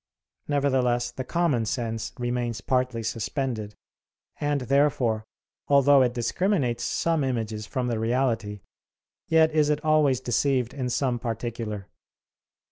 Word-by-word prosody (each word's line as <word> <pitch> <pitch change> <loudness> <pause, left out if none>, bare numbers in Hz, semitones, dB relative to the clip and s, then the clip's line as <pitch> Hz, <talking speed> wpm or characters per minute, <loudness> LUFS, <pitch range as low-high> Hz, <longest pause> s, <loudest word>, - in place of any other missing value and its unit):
Nevertheless, 130 -4 +1
the 130 +2 -5
common 150 -4 +1
sense 115 -2 -3
remains 120 -2 -2
partly 125 +1 0
suspended; 115 -1 -3 0.6
and 145 -1 0
therefore, 125 -5 +1 0.4
although 140 0 +6
it 125 -1 +1
discriminates 130 - 0
some 165 -3 0
images 110 -4 -2
from 130 -2 -2
the 120 -2 -1
reality, 115 -3 0 0.7
yet 160 -1 +4
is 155 -1 +2
it 150 +1 -1
always 150 -5 +3
deceived 130 0 0
in 130 -3 -3
some 125 -1 0
particular. 115 -3 -4
125 Hz, 120 wpm, -26 LUFS, 115-140 Hz, 0.7 s, although